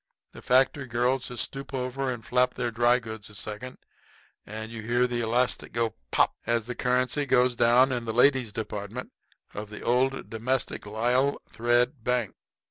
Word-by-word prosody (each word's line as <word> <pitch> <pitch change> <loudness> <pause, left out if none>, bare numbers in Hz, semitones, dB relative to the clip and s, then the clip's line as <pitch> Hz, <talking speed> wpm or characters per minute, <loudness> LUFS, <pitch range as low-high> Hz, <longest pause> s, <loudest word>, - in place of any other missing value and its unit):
The - - -12
factory 130 +2 +2
girls 125 +2 0
just 125 -2 -1
stoop 135 0 -6
over 130 +1 -2
and 115 -3 -7
flap 125 +1 +2
their 120 -1 -2
dry 120 +2 +4
goods 110 -4 -8
a 105 - -13
second, 110 +5 -6 0.7
and 110 +2 -6
you 115 -1 -6
hear 120 +3 +2
the 120 -1 -1
elastic 120 +2 0
go 115 -1 0 0.2
"pop" - - +3
as 115 -2 +1
the 125 - -4
currency 125 +3 0
goes 125 -1 +3
down 120 +3 +5
in 120 -2 -2
the 110 - -2
ladies' 125 -1 +3
department 105 +2 -5 0.4
of 105 0 -6
the 105 - -9
"Old 130 +3 +1
Domestic 120 0 -2
Lisle 125 +6 +1
Thread 120 +2 +1
Bank." 125 -4 0
120 Hz, 170 wpm, -27 LUFS, 115-125 Hz, 0.7 s, down